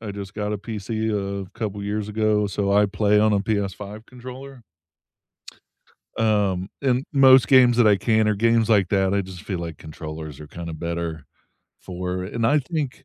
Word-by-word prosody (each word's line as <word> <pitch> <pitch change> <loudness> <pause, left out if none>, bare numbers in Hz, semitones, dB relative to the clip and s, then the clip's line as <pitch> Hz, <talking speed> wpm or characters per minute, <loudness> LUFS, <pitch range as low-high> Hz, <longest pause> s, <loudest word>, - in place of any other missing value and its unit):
I 110 -2 -6
just 100 -1 -7
got 105 0 -3
a 105 - -2
PC 110 +1 -3 0.4
a - - -21
couple 105 -3 -3
years 105 +1 -3
ago, 105 -1 +1
so 100 0 -1
I 105 +1 +4
play 105 +1 +2
on 110 0 +3
a 100 - +2
PS5 100 +1 -4
controller. 130 +1 -11 1.5
Um, 100 -4 +1
and 130 -1 +1
most 130 -2 +7
games 125 -3 +6
that 120 -2 +5
I 105 -1 +5
can 110 +2 +2
are 105 - +2
games 115 +1 +2
like 100 -4 +4
that. 95 -1 +1
I 100 - +2
just 95 -1 -8
feel 95 -4 -4
like 85 -2 -6
controllers 80 -1 -8
are 75 - -9
kinda 85 0 -7
better 85 -2 -4 0.5
for 90 0 -4
and 115 +3 -2
I 145 +6 +4
think 145 -2 -4
105 Hz, 180 wpm, -23 LUFS, 95-115 Hz, 1.5 s, most